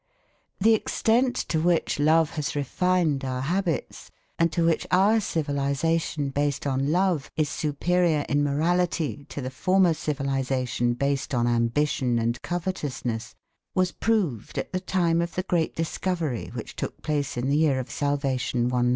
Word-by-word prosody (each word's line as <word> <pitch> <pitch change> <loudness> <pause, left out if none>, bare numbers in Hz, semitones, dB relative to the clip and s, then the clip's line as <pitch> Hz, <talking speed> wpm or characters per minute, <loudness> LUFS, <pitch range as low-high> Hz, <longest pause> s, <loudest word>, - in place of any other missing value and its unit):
The 225 +4 +5
extent 240 +3 +2
to 160 - +1
which 170 -3 +1
love 160 +1 +4
has 150 -1 -3
refined 155 0 +1
our 130 -1 -2
habits, 175 +2 -2 0.3
and 165 0 +3
to 165 +1 +1
which 165 -1 +1
our 195 +6 +4
civilisation 145 -2 -1
based 145 0 -1
on 135 +1 0
love 180 -4 +1
is 155 -2 +1
superior 155 +1 +1
in 145 +1 +2
morality 155 0 0
to 145 - -5
the 130 0 -4
former 185 +5 +3
civilisation 135 -4 -1
based 140 +1 -1
on 120 -1 +2
ambition 120 +1 +1
and 115 +1 -1
covetousness, 150 -10 -3 0.4
was 185 -1 +2
proved 185 - -1
at - - -3
the 185 - 0
time 175 -3 +1
of 170 0 -4
the 185 - -1
great 170 -3 0
discovery 165 -5 -2
which - - -6
took - - -5
place 145 -4 -1
in 120 +2 -1
the 140 +2 +2
Year 150 -4 +3
of 130 - -6
Salvation 135 -4 0
194. 125 -1 +2
150 Hz, 150 wpm, -26 LUFS, 135-175 Hz, 0.4 s, The